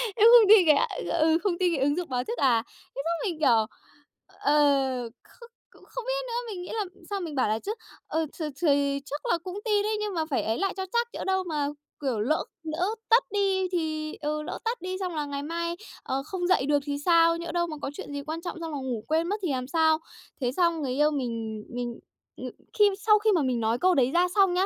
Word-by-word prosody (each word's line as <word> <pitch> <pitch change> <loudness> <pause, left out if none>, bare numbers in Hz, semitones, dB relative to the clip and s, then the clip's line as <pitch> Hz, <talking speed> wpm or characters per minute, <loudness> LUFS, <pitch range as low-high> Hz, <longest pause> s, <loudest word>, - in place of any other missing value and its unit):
em 445 +1 +6
không 455 -4 +8
tin 425 -4 +8
cái 300 - +7
à, - - +2 0.3
ừ, 320 +1 +4
không 395 -4 +2
tin 360 -2 +2
cái 270 - 0
ứng 285 +1 +2
dụng 355 -3 -3
báo 250 -1 -1
thức 465 - -5
à?" 235 -4 +3 0.3
Thế 275 - -2
xong 340 +4 -1
mình, 325 -3 -6
kiểu, 230 -7 +4 0.6
ờ 275 -4 +1
không 470 -1 -16 0.2
cũng - - -20
không - - -6
biết - - -1
nữa. 475 - -5 0.2
Mình 370 -3 -6
nghĩ - - -9
là 430 -3 -1 0.2
sau 400 -1 -2
mình 325 -5 -5
bảo 260 - +2
là 220 - 0
chứ: 415 - -4 0.3
"Ờ, 320 +1 0
th - - -2 0.2
thì 280 -3 +2
chắc 290 +1 -6
là 345 - +2
cũng 365 +4 -7
tin 415 -2 +2
đấy 430 +1 0
nhưng 420 -2 -2
mà 320 -2 -1
phải 270 - 0
ấy 220 +1 -1
lại 390 -1 0
cho 380 - -2
chắc. 470 0 +2
Nhỡ - - -5
đâu 380 0 +1
mà, 300 -5 -1 0.3
kiểu, 260 -6 -1
lỡ 260 +9 +1 0.2
lỡ 320 +3 -1 0.2
tắt 465 +2 +6
đi 390 -2 +1
thì 310 -3 -2
ừ, 305 0 -1
lỡ 335 - -5
tắt 470 +2 -1
đi 370 0 -4
xong 365 -3 -3
là 300 -1 -1
ngày 285 0 -4
mai, 335 +2 -3 0.3
ờ, 270 +1 -2
không 355 +1 -3
dậy 365 -8 +3
được 290 0 +3
thì 285 -1 -2
sao? 335 -1 +5
Nhỡ 340 -1 -5
đâu 345 0 0
mà 310 -2 -6
có 275 - -3
chuyện 290 - -8
gì 285 - -3
quan 315 +3 -5
trọng 350 0 -5
xong 330 -1 -5
là - - -2
ngủ 255 -5 -4
quên 320 +2 +1
mất 410 - 0
thì 340 - 0
làm 255 -1 -2
sao?" 315 +1 +3 0.4
Thế 245 - +1
xong 340 +2 +1
người 265 -3 -2
yêu 295 +3 +3
mình 230 -6 -3
mình 240 -1 -4 0.4
ừm, - - -5 0.3
khi 415 - +8 0.2
sau 425 -1 +7
khi 435 0 +3
mà 345 -6 +3
mình 255 -3 0
nói 225 +1 +1
câu 370 0 +4
đấy 260 -1 +3
ra 350 +3 +3
xong 390 -3 +5
nhá, 370 +2 +2
320 Hz, 255 wpm, -27 LUFS, 280-370 Hz, 0.6 s, không